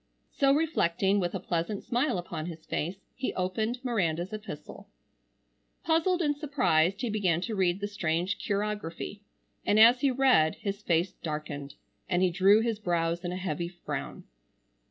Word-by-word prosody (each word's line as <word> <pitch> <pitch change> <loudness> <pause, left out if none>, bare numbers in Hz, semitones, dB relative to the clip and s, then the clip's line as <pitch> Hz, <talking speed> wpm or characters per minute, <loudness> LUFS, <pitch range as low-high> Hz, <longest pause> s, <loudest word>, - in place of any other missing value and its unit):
So 275 -1 +3
reflecting, 205 - +2
with 175 0 -1
a - - -1
pleasant 175 +3 -2
smile 245 -1 0
upon 170 -2 -5
his 165 -2 -8
face, 185 +5 -3
he 260 - -3
opened 215 +6 -1
Miranda's 180 -6 0
epistle. 215 0 -8 0.9
Puzzled 335 +2 +2
and 295 -1 +1
surprised 200 - +1
he 245 - -1
began 185 -6 +1
to 220 +4 -3
read 185 -2 +1
the 205 - -1
strange 185 -1 -1
chirography, 205 -2 -3 0.4
and 210 - +3
as 240 +3 +7
he 280 - +4
read 255 -12 +4
his 200 0 -4
face 175 -1 +1
darkened 150 -5 -6 0.3
and 180 0 +2
he 185 - +3
drew 195 +4 +5
his 225 -2 -1
brows 170 -2 0
in 175 - -3
a 180 - -3
heavy 170 -2 -2
frown. 175 0 -6
190 Hz, 155 wpm, -29 LUFS, 170-225 Hz, 0.9 s, as